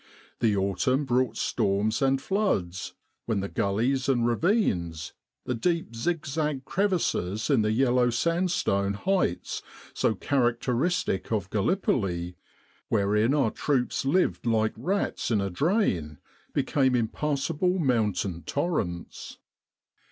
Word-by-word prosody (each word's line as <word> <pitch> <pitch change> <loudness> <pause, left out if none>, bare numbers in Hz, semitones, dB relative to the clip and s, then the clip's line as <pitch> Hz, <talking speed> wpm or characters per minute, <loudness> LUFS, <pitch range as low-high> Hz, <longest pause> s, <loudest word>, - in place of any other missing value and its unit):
The 110 -3 +2
autumn 130 +9 +1
brought 125 -1 +1
storms 105 +5 0
and 135 0 +3
floods, 135 - -1 0.3
when 110 -3 0
the 100 - -2
gullies 120 +9 0
and 120 -3 +2
ravines, 110 - 0 0.3
the 125 - -1
deep 165 -1 -1
zigzag 150 0 -2
crevices 155 - 0
in 130 -5 +4
the 105 0 +1
yellow 125 +1 +3
sand 170 +10 +1
stone 100 - 0
heights 180 - -1 0.3
so 110 - +1
characteristic 125 - 0
of 100 -4 -1
Gallipoli 95 - 0 0.5
wherein 105 +1 +2
fc 150 - +2
our 110 - 0
troops 130 -4 0
lived 145 -2 +1
like 110 -1 +2
rats 185 - -1
in 110 -3 +2
a 100 -1 -2
drain 90 - 0 0.3
became 130 -3 +1
impassable 150 +9 0
mountain 105 - 0
torrents. 90 - -3
120 Hz, 115 wpm, -27 LUFS, 100-150 Hz, 0.5 s, in